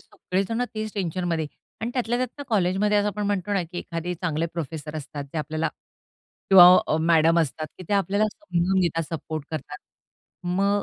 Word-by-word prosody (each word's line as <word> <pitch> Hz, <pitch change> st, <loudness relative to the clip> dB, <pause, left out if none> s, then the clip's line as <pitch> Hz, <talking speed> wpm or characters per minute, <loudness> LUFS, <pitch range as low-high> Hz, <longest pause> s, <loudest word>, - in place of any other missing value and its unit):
सगळेजण 195 Hz, +6 st, -2 dB
तेच 215 Hz, -1 st, -4 dB
टेन्शनमध्ये 175 Hz, -4 st, -1 dB, 0.3 s
आणि 230 Hz, +2 st, -2 dB
त्यातल्या 240 Hz, -1 st, 0 dB
त्यात 255 Hz, +3 st, -4 dB
कॉलेजमध्ये 205 Hz, 0 st, +2 dB
असं 205 Hz, -, +1 dB
आपण 210 Hz, 0 st, -3 dB
म्हणतो 205 Hz, 0 st, -1 dB
ना 195 Hz, -3 st, +2 dB
की 175 Hz, +2 st, -7 dB
एखादे 170 Hz, +1 st, -4 dB
चांगले 165 Hz, -2 st, -1 dB
प्रोफेसर 155 Hz, -1 st, -5 dB
असतात 145 Hz, -1 st, -6 dB
जे 160 Hz, -, -2 dB
आपल्याला 155 Hz, +2 st, -1 dB, 0.8 s
किंवा 190 Hz, -2 st, +11 dB, 0.2 s
अ, -, -, +1 dB
मॅडम 165 Hz, 0 st, +4 dB
असतात 155 Hz, +1 st, -2 dB
की 185 Hz, -, -8 dB
ते -, -, -1 dB
आपल्याला 200 Hz, +1 st, +2 dB
समजून 190 Hz, -, 0 dB
घेतात, 165 Hz, -2 st, +1 dB
सपोर्ट 155 Hz, -1 st, -5 dB
करतात. 150 Hz, -1 st, -5 dB, 0.7 s
मग 200 Hz, +3 st, +1 dB
180 Hz, 165 wpm, -25 LUFS, 160-205 Hz, 0.8 s, किंवा